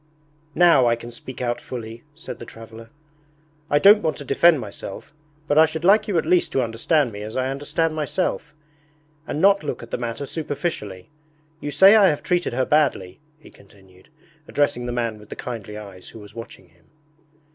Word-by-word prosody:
'Now 170 -7 +5
I 115 - +3
can 120 +1 -10
speak 125 +2 -8
out 120 0 -2
fully,' 115 -2 -8
said 160 - -9
the 120 - -8
traveller. 115 0 -12 0.8
'I 145 - +3
don't 205 +6 +7
want 160 - -1
to 145 - -9
defend 160 +3 +4
myself, 100 +2 -9 0.3
but 150 +1 +3
I 160 - +7
should 160 +2 -5
like 205 +3 +5
you 200 -5 0
at 160 - 0
least 175 +2 +2
to 130 - +2
understand 120 +4 0
me 100 -1 -8
as 110 +3 -6
I 130 +1 -1
understand 155 +4 -1
myself, 155 -1 -3 0.7
and 145 - -3
not 200 +1 +4
look 130 -5 -5
at 115 - -12
the - - -3
matter 120 +3 -4
superficially. 140 - -5 0.5
You 145 - -5
say 190 +9 +7
I 205 -3 +6
have 150 -5 0
treated 175 -7 0
her 130 +1 0
badly,' 135 -12 0 0.2
he 155 - -17
continued, 95 -2 -21 0.4
addressing 125 -4 0
the - - -3
man 115 -3 -2
with 105 - -16
the - - -7
kindly 105 -4 -7
eyes 100 -3 -11
who 115 - -12
was 105 -1 -13
watching 115 -5 -11
him. 85 0 -30
130 Hz, 190 wpm, -22 LUFS, 115-160 Hz, 0.8 s, don't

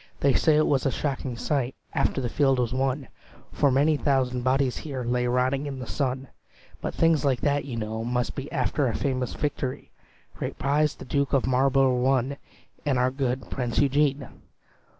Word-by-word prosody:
"They 140 -1 +4
say 155 +3 +4
it 155 - +4
was 140 -1 +2
a - - +1
shocking 135 -4 -3
sight 135 -1 -1 0.2
After 135 - 0
the 125 - -1
field 135 +1 +2
was 125 -1 0
won; 135 0 -1 0.4
For 145 - +2
many 145 +4 +3
thousand 130 -3 +1
bodies 130 0 +1
here 135 -5 -5
Lay 125 +1 0
rotting 130 +3 +1
in 135 -2 -5
the 130 - -6
sun: 135 +1 -2 0.5
But - - -4
things 165 -3 +3
like 135 -3 +1
that, 145 -1 +1
you 130 -4 -5
know, 110 0 -3
must 125 +1 -1
be 140 0 -6
After 135 +1 0
a 115 - -1
famous 130 -3 -1
victory. 140 -3 -3 0.4
"Great - - -5
praise 150 +2 +1
the - - -10
Duke 140 +2 0
of 135 - +3
Marlbro' 130 0 +3
won, 135 +1 +1 0.5
And 140 -4 +1
our 125 +1 +2
good 130 -3 -2
Prince 120 -3 -2
Eugene." 140 -1 +2
135 Hz, 185 wpm, -26 LUFS, 125-140 Hz, 0.5 s, They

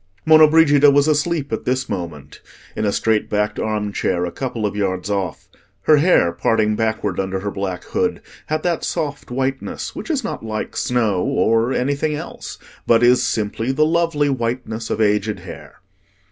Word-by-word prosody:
Monna 155 0 +7
Brigida 150 -2 +5
was 140 +1 +3
asleep 150 -2 0
at 110 - -2
this 130 +1 0
moment, 85 -6 -6 0.3
in - - -1
a 100 - +2
straight 110 +1 0
backed 105 0 -1
arm 105 -1 -2
chair, 90 -2 0
a 85 - -4
couple 120 +1 -4
of 100 - -2
yards 95 -1 -2
off. 95 -5 -3 0.4
Her 155 - +5
hair, 145 - +4
parting 105 +5 +1
backward 110 -4 -1
under 95 0 -2
her 100 0 -3
black 95 -3 -4
hood, - - -1 0.3
had 155 0 -2
that 175 -2 -1
soft 145 -5 -3
whiteness 135 +1 -3
which - - -7
is 290 -6 0
not 230 - -5
like 110 -1 -4
snow 110 -7 0
or 115 +5 +1
anything 140 +4 0
else, - - -8 0.3
but 115 0 +4
is 125 +1 +5
simply 110 +3 -1
the 150 +3 +2
lovely 165 -2 +1
whiteness 115 -3 -3
of - - -2
aged 105 0 +1
hair. - - -11
115 Hz, 175 wpm, -20 LUFS, 105-145 Hz, 0.4 s, Monna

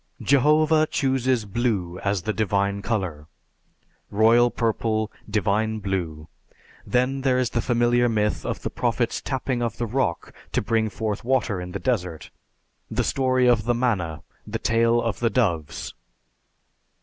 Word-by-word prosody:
Jehovah 155 +3 +4
chooses 130 -5 0
Blue 100 -5 -1
as 100 -2 -1
the 110 - -1
divine 100 -1 0
color. 95 -9 -3 0.8
Royal 115 +3 +4
Purple. 110 -2 -1 0.2
Divine 110 +1 0
Blue. 90 -6 -3 0.6
Then 130 +2 +1
there 130 -2 +2
is 130 -2 0
the 120 - 0
familiar 120 0 +2
myth 105 -2 0
of - - -4
the - - -3
Prophet's - - -1
tapping 130 -2 -2
of 115 -2 -2
the 120 - -1
rock 115 -7 -2 0.2
to - - +2
bring 110 -1 +1
forth 105 -1 -3
water 120 -6 0
in 90 0 -7
the 100 - -3
desert; 90 -7 -2 0.6
the - - 0
story 130 -1 +1
of 115 -3 +3
the 120 0 +2
manna; 95 -11 -1 0.2
the - - -2
tale 115 +1 +2
of 115 -2 -2
the 120 - +2
doves. 85 - -1
115 Hz, 145 wpm, -24 LUFS, 100-125 Hz, 0.8 s, Jehovah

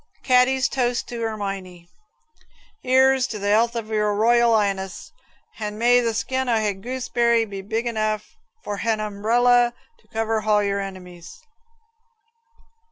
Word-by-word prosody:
Caddy's 255 +1 +3
Toast 245 -2 -2
in 235 -1 -5
"Erminie" 195 -5 -5 1.0
'Ere's 265 0 +3
to 225 - -6
the 205 0 -2
'ealth 230 +3 +2
o' 230 - -1
your 210 -1 -1
Royal 235 +2 +3
'Ighness; 195 -2 -2 0.5
hand 210 -1 -5
may 245 +2 +4
the 230 -2 -1
skin 260 +2 -2
o' 235 - +3
ha 210 -2 0
gooseberry 235 +1 0
be 200 -2 -7
big 225 +4 -3
enough 215 -2 -2 0.3
for 205 - -4
han 225 +1 0
humbrella 240 +4 +2 0.3
to - - -30
cover 225 0 -1
hall 210 -1 +2
your 200 0 -1
enemies." 185 - -9
220 Hz, 140 wpm, -22 LUFS, 205-240 Hz, 1.0 s, may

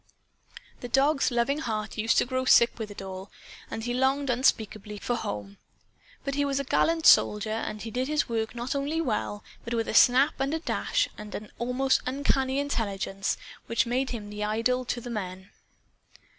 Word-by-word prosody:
The 245 - -6
dog's 275 +3 +3
loving 245 +4 +1
heart 215 -6 -3
used 225 +1 +1
to - - +4
grow 255 +1 -1
sick 235 -2 +5
with 220 -1 -4
it 205 -1 -8
all; 190 +1 -7 0.4
and 225 - -5
he 240 +1 -2
longed 265 +2 +1
unspeakably 215 -4 0
for 240 - -2
home. 100 - -5 0.6
But 275 - -2
he 285 +1 +1
was 280 -1 0
a - - -1
gallant 325 +4 +1
soldier, 210 +1 +5
and 215 -1 -3
he 225 - -6
did 255 +2 -1
his 300 0 0
work 225 -1 -2
not 240 +1 -3
only 285 +3 -1
well, 215 -7 -2 0.2
but 235 +1 -3
with 225 -1 -1
a - - -2
snap 260 +4 +6
and 275 +3 0
a - - -2
dash - - 0
and 210 -1 -7
an 210 - -7
almost 250 +2 +1
uncanny 265 0 0
intelligence 200 -8 -2 0.3
which 230 +3 +1
made 255 +3 0
him 210 -4 -6
an 210 0 -6
idol 230 +4 0
to 240 - -3
the 245 - -7
men. 190 -3 -5
240 Hz, 185 wpm, -27 LUFS, 215-270 Hz, 0.6 s, snap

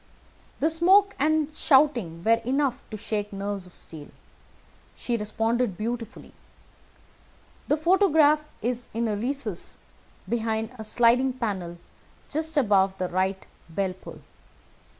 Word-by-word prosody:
The 315 +3 +3
smoke 385 +5 +4
and 310 +1 +1
shouting 250 - +2
were 230 +2 +3
enough 265 0 0
to 215 - -6
shake 210 0 -3
nerves 200 -1 -4
of 180 - -17
steel. 155 -3 -9 0.9
She 240 - -2
responded 225 -1 -1
beautifully. 230 +1 -5 1.3
The 295 - +2
photograph 310 -3 +4
is 245 +1 -2
in 230 0 0
a 210 - -1
recess 230 -4 -3 0.5
behind 225 -1 -1
a - - -5
sliding 240 +4 +3
panel 195 -9 -4 0.5
just 315 +1 -2
above 195 -6 +3
the 185 -1 -2
right 190 +1 -1 0.2
bell 185 +3 -1
pull. 185 - -12
230 Hz, 120 wpm, -26 LUFS, 200-285 Hz, 1.3 s, smoke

